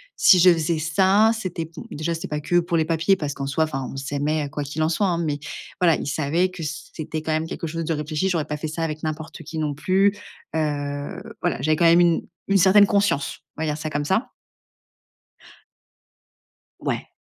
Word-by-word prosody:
si 185 - +6
je 180 +1 +8
faisais 165 0 0
ça, 190 +7 +4
c'était 180 -5 -4
b 160 - -17 0.2
déjà, 160 +3 -2
c'était 165 - -5
pas 150 0 -3
que 175 +3 +2
pour 170 -1 0
les 160 - +2
papiers 165 +4 +2
parce 150 -6 -3
qu'en 140 -1 -5
soi, 150 +4 +1
enfin, 135 -4 -4
on - - -9
s'aimait, 145 +2 -1
quoi 145 - -3
qu'il 150 +3 -2
en 155 - +2
soit, 200 +4 +1
hein. 175 -2 0
Mais 145 -2 -2 0.4
voilà, 165 -4 +5
ils - - -5
savaient 160 +5 +1
que 185 -2 -9
c 150 - -5
c'était, 155 0 -4
quand 160 - -2
même, 155 +1 -1
quelque 165 - -5
chose 165 +1 -3
de 165 - 0
réfléchi. 155 +4 -1
J'aurais 165 -5 0
pas 150 - -4
fait 155 +1 -4
ça 160 +2 -3
avec 155 -1 -3
n'importe 155 +1 -5
qui, 160 +2 -7
non 150 -2 -1
plus, 195 +6 +2 0.4
heu, 145 -2 -2 0.2
voilà, - - -1
j'avais, 155 +1 +2
quand 170 - +3
même, 170 +1 +7
une 170 -2 +3 0.2
une 195 - +5
certaine 195 +2 +7
conscience, 200 -9 +1 0.2
on 160 - -5
va - - -1
dire 150 0 -1
ça 155 0 -4
comme 145 -1 -2
ça. 190 - 0 2.5
Ouais. - - -3
160 Hz, 215 wpm, -23 LUFS, 150-175 Hz, 2.5 s, je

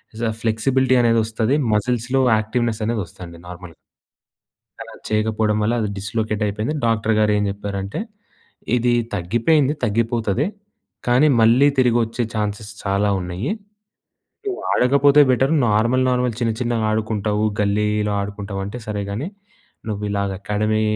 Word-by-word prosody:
ఇజ 115 - -5 0.2
flexibility 130 +3 +2
అనేదొస్తది. 115 +2 +1 0.2
మజిల్స్‌‌లో 125 +4 0 0.2
activeness 110 0 -1
అనేదొస్తదండి 90 -6 -5
normal 90 -1 -10 1.1
అలా - - -9 0.2
చేయకపోవడం 110 0 +1
వల్ల 115 +3 +1
అది 105 - -1
డిస్‌లొకేట్ 110 +2 -2
అయిపోయింది. 105 +9 -2
డాక్టర్‌గారేం 105 -2 +2
జెప్పారంటే 100 - -4 0.8
"ఇది 120 0 +2 0.2
తగ్గిపోయింది. 120 - +2
తగ్గిపోతది. 115 - 0 0.6
కానీ 125 +5 +4
మళ్ళీ 120 +5 +5
తిరిగొచ్చే 120 -2 +2
చాన్స్‌స్ 105 0 -3
చాలా 100 +1 +1
ఉన్నయి. 90 +7 -3 1.0
నువ్వు 380 -1 -3
ఆడకపోతే 140 +3 +4
బెటర్. 135 +4 +2 0.2
నార్మల్ 115 +5 +2
నార్మల్ 125 -2 0
చిన్న 115 -2 +1
చిన్నగ 120 -2 0
ఆడుకుంటావు. 110 -1 -1 0.2
గల్లీలో 105 +1 +1
ఆడుకుంటవంటే 100 +1 -5
సరే 105 -1 -3
గని 120 - -3 0.6
నువ్విలాగ 100 -1 -2
అకాడమీ 105 +2 0
110 Hz, 110 wpm, -21 LUFS, 105-120 Hz, 1.1 s, మళ్ళీ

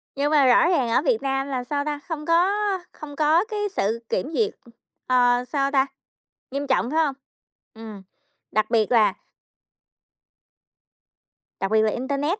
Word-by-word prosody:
Nhưng 285 +2 0
mà 295 -3 +5
rõ 255 +5 +5
ràng 245 -4 0
ở 230 - +2
Việt 470 -3 +1
Nam 270 0 -1
là 260 -3 -3
sao 285 +3 -3
ta, 295 -1 -3
không 315 -3 -5
có 340 +4 +3 0.4
không 290 -2 -10
có 315 +5 +3
cái 430 -2 -5 0.2
sự 220 +4 0
kiểm 275 +11 -2
duyệt, 430 +4 0 0.5
ờ, 245 -1 +3
sao 275 +1 -1
ta, 270 -1 +3 0.7
nghiêm 280 +1 -3
trọng, 260 -2 +1
phải 320 - +1
hông? 280 -2 -3 0.6
Ừm, 220 -3 -10 0.5
đặc 215 - 0
biệt 225 -2 +1
là 225 -3 +4 2.5
Đặc 195 +1 -2
biệt 220 0 +4
là 215 0 +2
internet 280 - -2
275 Hz, 160 wpm, -23 LUFS, 245-300 Hz, 2.5 s, mà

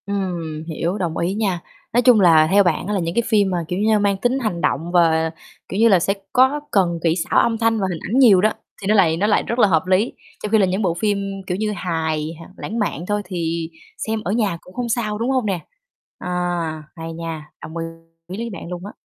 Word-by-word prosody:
Ừm, 175 -6 -3
hiểu, 170 +4 -2
đồng 170 -5 -2
ý 175 +3 0
nha. 200 -4 -1 0.3
Nói 240 - +4
chung 245 -2 +6
là 160 -4 +6
theo 200 +1 +6
bạn 175 0 0
á 210 - -1
là 200 - +1
những 170 -1 -3
cái 235 - +3
phim 205 -4 +3
mà, 180 - 0
kiểu 180 +2 -2
như, 215 0 +3
mang 200 -1 +1
tính 245 +6 0
hành 215 -9 -2
động 165 +5 0
và, 160 -2 +3 0.4
kiểu 195 - -3
như 230 - +6
là, 195 -5 +5
sẽ 195 +3 +1 0.2
có 265 +3 +4
cần 175 -4 +2
kỹ 165 -1 +3
xảo 170 - +1
âm 230 -1 +2
thanh 225 0 +2
và 190 - 0
hình 165 - -4
ảnh 245 +6 +2
nhiều 210 -9 +7
đó, 215 - +4 0.3
thì 195 - -4
nó 215 - +4
lại 165 -5 +4
nó 200 +4 +1
lại 210 - +3
rất 235 - -3
là 210 - +6
hợp 165 -2 +2
lý, 190 +5 +2 0.3
trong 210 - -3
khi 220 - +5
là 200 - +4
những 185 +3 -1
bộ 180 -5 +1
phim, 205 +3 0 0.3
kiểu 180 - -1
như, 215 +1 -1
hài 160 -5 -2
h - - -9 0.2
lãng 225 +3 -4
mạn 175 -6 -2
thôi, 205 0 0
thì 170 -3 -3 0.4
xem 220 0 -1
ở 185 - -2
nhà 205 -6 0
cũng 180 - -16
không 245 +1 -3
sao, 220 -3 -1
đúng 230 +4 -1
hông 260 -3 +1
nè? 195 -4 -1 0.6
À, - - -7 0.7
hay 165 -1 -6
nha, 165 -2 -6
đồng 160 - -7
ý 165 - -2 0.5
với 230 +1 -4
bạn 170 - -8
luôn 180 +1 -6
á. 205 - -7
190 Hz, 250 wpm, -21 LUFS, 170-215 Hz, 0.7 s, nhiều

